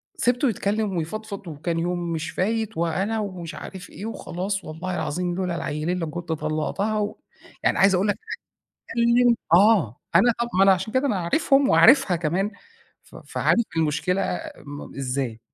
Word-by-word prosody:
سِبته 250 +2 +2
يتكلّم 205 -1 -1
ويفضفض 200 +4 -5
وكان 165 +2 -3
يوم 175 +1 -1
مش 160 0 -3
فايت، 220 +1 -1
وأنا 190 +7 0
ومش 185 -6 -5
عارف 190 -2 -9
إيه 210 - -8
وخلاص 195 -3 -4
والله 175 +4 -5
العظيم 175 +3 -2
لولا 180 -2 -2
العيلين 160 +3 -2
لكنت 170 +1 -4
طلّقتها، 160 +8 -1
و 205 0 -2 0.5
يعني - - +2
عايز 195 -1 +5
أقول 195 +3 +1
لَك 205 - 0 0.7
اتكلّم 235 +1 +4 0.2
آه 185 - +5 0.2
أنا 235 +7 +6
طَب 235 - 0
ما 190 - +6
أنا 195 - +7
عشان 190 +5 -3
كده 260 +2 +2
أنا 215 -7 0
عارفهم 275 - +2
وعارفها 250 - +6
كمان 175 +6 -1 0.5
ف - - -18
فعارف 235 - +1
المشكلة 180 +5 0 0.3
م 145 0 -9
إزاي، 130 -4 -3
185 Hz, 155 wpm, -24 LUFS, 165-215 Hz, 0.7 s, أنا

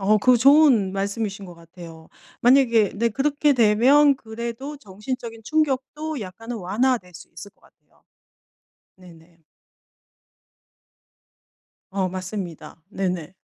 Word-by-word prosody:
어 210 +2 +3
그거 250 +3 +4
좋은 260 -7 +4
말씀이신 200 0 -4
것 175 - -12
같아요. 165 -1 -14 0.3
만약에 235 -5 +4
네 230 +3 0
그렇게 285 +4 +1
되면 255 +5 +4
그래도 235 +5 -7
정신적인 225 +1 -8
충격도 300 0 -2
약간은 225 +5 -8
완화될 205 0 -1
수 175 - -12
있을 200 - -11
것 - - -39
같아요. - - -29 0.9
네네. 170 -2 -18 2.5
어 190 -1 -1
맞습니다. 185 -4 -7
네네. 180 -3 -4
215 Hz, 240 characters per minute, -22 LUFS, 185-260 Hz, 2.5 s, 그거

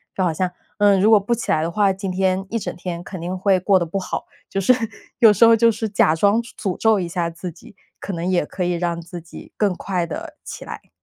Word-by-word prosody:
就 190 - 0
好 175 - +2
像， 180 +3 -1 0.3
嗯， 205 -2 +4
如 215 - +5
果 220 - +7
不 205 +4 0
起 235 - -3
来 155 - +2
的 165 - -1
话， 200 +3 +2
今 195 0 -4
天 190 +1 0
一 230 - -1
整 225 - -4
天 175 -1 -5
肯 185 -1 -8
定 180 +3 -4
会 190 0 +3
过 190 +1 +3
得 175 - 0
不 180 +4 -3
好， 185 - -4 0.2
就 195 - -1
是 220 - +4 0.5
有 220 -3 +7
时 210 - +3
候 230 0 +8
就 230 +1 +5
是 220 -1 -2
假 165 -5 +3
装 205 +6 +3
诅 230 -6 -5
咒 220 -1 +3
一 175 - -2
下 170 -1 -2
自 170 +2 -7
己， 180 - -16 0.2
可 200 - -5
能 170 0 -3
也 185 -4 +2
可 185 - -4
以 180 - 0
让 170 -1 -1
自 175 +1 -9
己 165 - -12
更 205 -3 +2
快 180 -2 -2
地 320 - -7
起 - - -8
来。 - - -9
190 Hz, 280 characters per minute, -21 LUFS, 175-210 Hz, 0.5 s, 候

